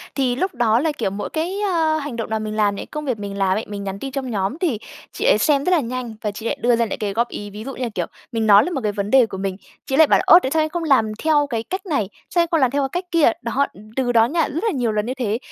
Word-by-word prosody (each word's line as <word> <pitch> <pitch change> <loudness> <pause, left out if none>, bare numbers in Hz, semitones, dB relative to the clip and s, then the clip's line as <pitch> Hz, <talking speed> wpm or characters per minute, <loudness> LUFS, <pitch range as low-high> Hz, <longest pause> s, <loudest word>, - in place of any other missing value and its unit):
Thì 255 -3 +1
lúc 370 +1 -2
đó 235 -1 +3
là 315 +1 +1
kiểu 230 -9 -2
mỗi 200 +2 -5
cái, 350 +5 -2
a, 325 -5 +1
hành 285 -4 -5
động 225 -2 -4
nào 220 0 -1
mình 215 0 -4
làm 205 -2 +2
này, - - -6
công 300 -1 -6
việc 245 -6 -2
mình 200 -1 -5
làm 195 0 +2
ấy, 220 - -3
mình 200 -1 -6
nhắn 195 0 -5
tin 270 -1 -5
trong 265 -2 -4
nhóm 200 +7 -1
thì 285 - 0 0.3
chị - - -4
ấy - - +5
xem 285 -3 +2
rất 365 - +1
là 350 - +4
nhanh 245 -3 -4
và 210 - -2
chị 220 +3 -9
lại - - -1
đưa 240 0 +4
ra 230 0 +1
lại 210 - -4
cái 205 -2 -2
góp 235 +2 +1
ý, 205 0 -6
ví 210 +2 -8
dụ 270 +1 -6
như 255 - -4
là 235 - -1
kiểu 175 -2 -1 0.3
mình 225 -1 -1
nói 205 0 +7
là 360 - -3
một 270 -6 -2
cái 210 - +1
vấn 200 0 -3
đề 265 -3 +6
của 190 - -7
mình, 195 -1 -3 0.3
chị 265 - -1
lại 315 0 +6
bảo - - +5
là - - -1
"Ô, 345 - +9
tại 265 -5 -3
sao 315 -1 +2
em 310 - -2
không 340 +1 -3
làm 245 -8 +3
theo 295 -2 +3
cái 230 -4 -2
cách 375 - -5
này? 250 - -1 0.2
Sao 345 - +2
em 335 - +1
không 325 - +3
làm 260 -2 +3
theo 285 0 0
cái 270 - -1
cách - - -33
kia?" 325 -8 +4
Đó, 260 +4 0
đ - - -19 0.2
từ 255 -2 +1
đó 225 -1 +5
nha, 320 +5 0
rất 330 +8 -3
là 445 - +1
nhiều 245 -5 0
lần 210 0 -1
như 255 - -2
thế, 230 -4 -1
245 Hz, 335 wpm, -21 LUFS, 215-300 Hz, 0.3 s, Ô